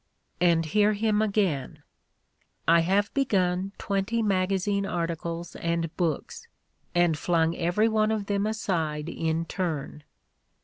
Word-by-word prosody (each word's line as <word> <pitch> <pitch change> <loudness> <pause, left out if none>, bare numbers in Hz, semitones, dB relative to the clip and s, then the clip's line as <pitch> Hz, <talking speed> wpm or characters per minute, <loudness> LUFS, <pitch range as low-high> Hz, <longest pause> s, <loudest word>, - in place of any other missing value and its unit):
And 170 -2 +3
hear 210 +6 +3
him 210 0 +1
again: 195 -10 -1 0.8
"I 170 +1 +6
have 195 +5 +1
begun 190 -8 +1
twenty 200 +4 -1
magazine 195 0 +1
arti 170 -3 -1
cles 170 +1 -6
and 170 -1 -1
books 165 -5 -2 0.2
— - - -42
and 175 -2 +3
flung 165 +1 +1
every 175 +6 +2
one 215 -1 +2
of 215 -2 -1
them 200 +1 0
aside 165 -8 -2
in 165 0 -1
turn." 160 -5 -4
180 Hz, 130 wpm, -27 LUFS, 165-205 Hz, 0.8 s, I